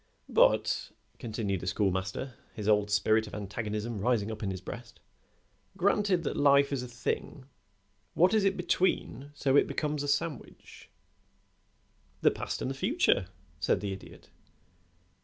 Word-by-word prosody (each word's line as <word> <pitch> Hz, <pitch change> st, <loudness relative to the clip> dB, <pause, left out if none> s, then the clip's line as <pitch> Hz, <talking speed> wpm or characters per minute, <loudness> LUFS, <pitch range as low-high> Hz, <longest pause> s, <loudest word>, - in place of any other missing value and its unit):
"But," -, -, +3 dB, 0.3 s
continued 105 Hz, -4 st, -2 dB
the 90 Hz, -, -7 dB
Schoolmaster, 95 Hz, +6 st, -1 dB, 0.2 s
his 105 Hz, -1 st, -5 dB
old 105 Hz, -1 st, +3 dB
spirit 110 Hz, +2 st, +2 dB
of -, -, -8 dB
antagonism 105 Hz, +2 st, -4 dB
rising 110 Hz, -1 st, +1 dB
up 110 Hz, -, -7 dB
in 100 Hz, -, -2 dB
his 95 Hz, -1 st, -4 dB
breast, 115 Hz, +5 st, -9 dB, 0.8 s
"granted 195 Hz, -2 st, +2 dB
that -, -, -2 dB
life 140 Hz, 0 st, +4 dB
is 135 Hz, -, -1 dB
a 125 Hz, -, -6 dB
thing, 125 Hz, +2 st, -4 dB, 0.7 s
what 180 Hz, +5 st, +4 dB
is 215 Hz, -2 st, +3 dB
it 195 Hz, 0 st, +2 dB
between 175 Hz, -7 st, 0 dB
so 135 Hz, -2 st, +1 dB
that 145 Hz, -, +8 dB
it -, -, +1 dB
becomes 150 Hz, -1 st, -2 dB
a 145 Hz, -, -3 dB
sandwich?" 145 Hz, 0 st, -4 dB, 1.3 s
"The -, -, +5 dB
past -, -, -4 dB
and 130 Hz, -, -1 dB
the -, -, -2 dB
future," 135 Hz, -, +2 dB, 0.3 s
said -, -, +2 dB
the 100 Hz, -2 st, -3 dB
Idiot. 95 Hz, -, -12 dB
120 Hz, 150 wpm, -30 LUFS, 105-145 Hz, 1.3 s, that